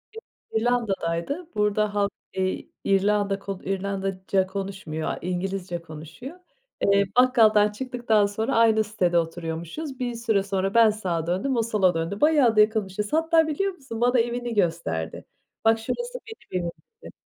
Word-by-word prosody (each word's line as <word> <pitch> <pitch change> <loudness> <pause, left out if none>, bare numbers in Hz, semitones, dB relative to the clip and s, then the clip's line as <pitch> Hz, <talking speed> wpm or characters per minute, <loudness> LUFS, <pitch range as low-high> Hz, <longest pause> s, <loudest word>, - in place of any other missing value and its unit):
Yok, 450 - -9 0.3
İrlanda'daydı, 225 - -1
burada 210 0 +1
halk, 200 -1 +1 0.2
eee 190 0 -2 0.2
İrlanda 200 0 +2
k 195 0 -5
İrlandaca 195 0 -1
konuşmuyor, 190 -5 -5
a - - -3
İngilizce 180 -1 -3
konuşuyor. 165 - -10 0.4
Eee, 200 0 +4
bakkaldan 220 -4 +5
çıktıktan 235 -2 +1
sonra 210 +3 -1
aynı 225 -1 +4
sitede 185 -5 0
oturuyormuşuz. 170 - -4
Bir 245 -1 -2
süre 220 -4 +1
sonra 195 0 -1
ben 230 -1 +6
sağa 180 -6 -2
döndüm, 195 +10 0
o 230 - +3
sola 205 -5 +2
döndü, 165 +5 -3
bayağı 290 -7 +4
da 215 - +7
yakınmışız. 210 -1 0
Hatta 325 0 +3
biliyor 385 +6 -1
musun 265 -8 -8
bana 245 +1 +4
evini 240 +1 -1
gösterdi. 165 - -1 0.4
"Bak, 225 0 +4
şurası 485 - -4
benim 315 - -5
evim." 170 - -2 0.3
dedi. - - -10
205 Hz, 145 wpm, -25 LUFS, 185-235 Hz, 0.4 s, da